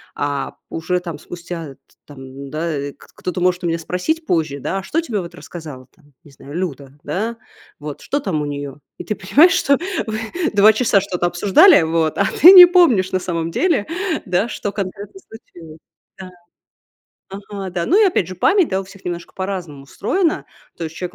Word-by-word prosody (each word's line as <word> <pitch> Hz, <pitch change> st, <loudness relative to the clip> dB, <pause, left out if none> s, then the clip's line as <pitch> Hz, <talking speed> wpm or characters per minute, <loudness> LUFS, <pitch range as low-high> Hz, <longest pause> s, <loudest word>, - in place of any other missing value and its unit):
а, 145 Hz, -1 st, -3 dB
уже 180 Hz, +2 st, -2 dB
там 170 Hz, -4 st, -7 dB
спустя, 170 Hz, -3 st, -8 dB
э, -, -, -14 dB
т -, -, -33 dB
там, 145 Hz, -2 st, -13 dB
м, 135 Hz, +1 st, -10 dB
да, 160 Hz, +4 st, -3 dB
э, 140 Hz, -1 st, -4 dB
кт -, -, -20 dB
кто-то 180 Hz, 0 st, -4 dB
может 180 Hz, 0 st, +1 dB
у -, -, 0 dB
меня 165 Hz, 0 st, 0 dB
спросить 185 Hz, -, -3 dB
позже, 155 Hz, -, -1 dB
да: 190 Hz, -, -3 dB
"А -, -, -8 dB
что 325 Hz, +11 st, -1 dB
тебе 240 Hz, -11 st, -3 dB
вот 170 Hz, -2 st, -8 dB
рассказала, 150 Hz, -7 st, -10 dB
там 145 Hz, -4 st, -27 dB
не 145 Hz, -, -17 dB
знаю, 140 Hz, +1 st, -13 dB
Люда, 145 Hz, -6 st, -5 dB
да, 225 Hz, +4 st, -3 dB, 0.4 s
вот, 150 Hz, -1 st, -7 dB
что 285 Hz, -, -2 dB
там 175 Hz, -, -2 dB
у -, -, -3 dB
нее?" 145 Hz, -1 st, -6 dB, 0.2 s
И -, -, -7 dB
ты 210 Hz, -, -3 dB
понимаешь, 285 Hz, -, +4 dB
что 280 Hz, -7 st, +2 dB, 0.3 s
вы 215 Hz, 0 st, -3 dB, 0.3 s
2 205 Hz, +1 st, +7 dB
часа 220 Hz, -3 st, +2 dB
что-то 180 Hz, -3 st, -3 dB
обсуждали, 190 Hz, -, +5 dB
вот, 160 Hz, -1 st, 0 dB
а 200 Hz, -, +2 dB, 0.2 s
ты 350 Hz, -, +11 dB
не 365 Hz, -2 st, +12 dB
помнишь 315 Hz, -, +3 dB
на 185 Hz, -, 0 dB
самом 170 Hz, -2 st, -3 dB
деле, 330 Hz, -, 0 dB, 0.4 s
да, 185 Hz, +4 st, 0 dB
что 205 Hz, -, -4 dB
конкретно 200 Hz, -, -6 dB
случилось. 170 Hz, -, -14 dB, 0.4 s
Да. 190 Hz, -1 st, -9 dB, 1.0 s
Ага, 195 Hz, -1 st, -7 dB
да. 175 Hz, -1 st, -3 dB
Ну, 390 Hz, +7 st, +4 dB
и, -, -, +6 dB
опять 340 Hz, -, 0 dB
же, 185 Hz, -, -7 dB
память, 380 Hz, -, +3 dB
да, 190 Hz, -, -1 dB
у -, -, -8 dB
всех 195 Hz, 0 st, -16 dB
немножко 175 Hz, -1 st, -6 dB
по-разному 185 Hz, -7 st, -5 dB
устроена. 325 Hz, -, -1 dB, 0.3 s
То 170 Hz, -, -5 dB
есть 160 Hz, 0 st, -7 dB
человек 180 Hz, +1 st, -6 dB
180 Hz, 200 wpm, -19 LUFS, 160-205 Hz, 1.0 s, не